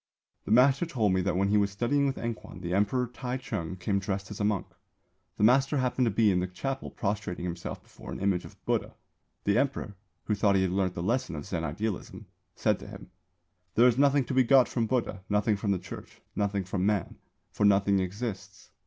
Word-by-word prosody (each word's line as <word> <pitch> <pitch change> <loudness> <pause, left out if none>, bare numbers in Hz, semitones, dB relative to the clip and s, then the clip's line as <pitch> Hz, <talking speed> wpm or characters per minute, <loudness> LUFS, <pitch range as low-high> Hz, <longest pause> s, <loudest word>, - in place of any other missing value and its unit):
"The - - -4
master 135 +7 +5
told 110 - +1
me 95 - +2
that 90 -1 0
when 100 +1 +2
he 105 - +4
was 100 -1 +2
studying 120 +8 +1
with 135 - -2
Enkwan, 115 -6 -6
the 90 -1 -3
Emperor 105 +6 +2
Tai 125 +1 -4
Chung 95 -9 -4
came 100 +2 -1
dressed 100 +1 -4
as 105 - -7
a - - 0
monk. 105 -3 +1 0.7
The - - 0
master 135 +5 +4
happened 130 -1 +1
to - - +3
be 110 0 +3
in 90 - +2
the 90 - -1
chapel 135 +9 -4
prostrating 100 -4 -3
himself 85 -1 -5
before - - -12
an - - -5
image 95 -2 +1
of - - -12
Buddha. - - -1 0.5
The 100 0 +3
Emperor, 135 -7 -2 0.3
who 105 - -1
thought 100 -1 +3
he 95 - +3
had 95 - 0
learnt 95 -1 0
the 85 - -3
lesson 115 -2 0
of 75 - -6
Zen 90 -4 -3
idealism, 95 +6 -4 0.3
said - - +1
to - - -10
him: - - -11 0.6
'There 120 +3 +7
is 120 +2 0
nothing 140 -1 +4
to - - -4
be 130 0 +5
got 130 +1 +5
from 115 -2 -1
Buddha, 120 -6 -1
nothing 105 +1 +2
from 100 +1 -3
the 100 - +2
Church, 90 - -10 0.2
nothing 100 -1 0
from 95 0 -2
Man; 100 -3 0 0.3
for - - -2
nothing 100 -1 +4
exists. 100 +3 -5
105 Hz, 215 wpm, -29 LUFS, 95-125 Hz, 0.7 s, There